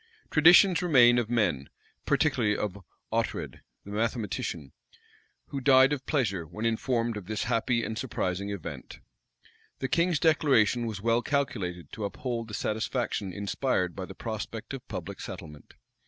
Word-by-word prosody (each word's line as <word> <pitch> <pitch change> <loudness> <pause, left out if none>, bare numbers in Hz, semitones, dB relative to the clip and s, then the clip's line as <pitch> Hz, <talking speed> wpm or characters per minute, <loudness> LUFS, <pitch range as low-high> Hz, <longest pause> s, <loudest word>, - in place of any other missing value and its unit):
Traditions 175 +2 +7
remain 125 -8 +6
of 115 -2 -2
men, 90 - 0 0.4
particularly 105 0 +2
of 100 -1 -3 0.3
Oughtred, - - -2 0.3
the 100 - -9
mathematician, 105 - -2 0.8
who 140 - -4
died 130 +1 +6
of 135 -2 -5
pleasure, 105 - 0
when 105 +8 -5
informed 115 0 0
of 95 -3 -8
this 110 -1 -2
happy 115 0 +1
and 110 - -3
surprising 100 -5 -2
event. 100 -4 -7 0.8
The 130 - -2
King's 170 +2 +2
declaration 125 -8 +3
was 105 -3 -5
well 115 +1 +3
calculated 100 - -2
to 110 - -4
uphold 115 +2 -4
the 105 - -6
satisfaction 110 -2 -2
inspired 100 - -1
by - - -5
the - - -11
prospect - - -5
of - - -7
public - - -6
settlement. 75 -2 -9
115 Hz, 140 wpm, -28 LUFS, 100-130 Hz, 0.8 s, Traditions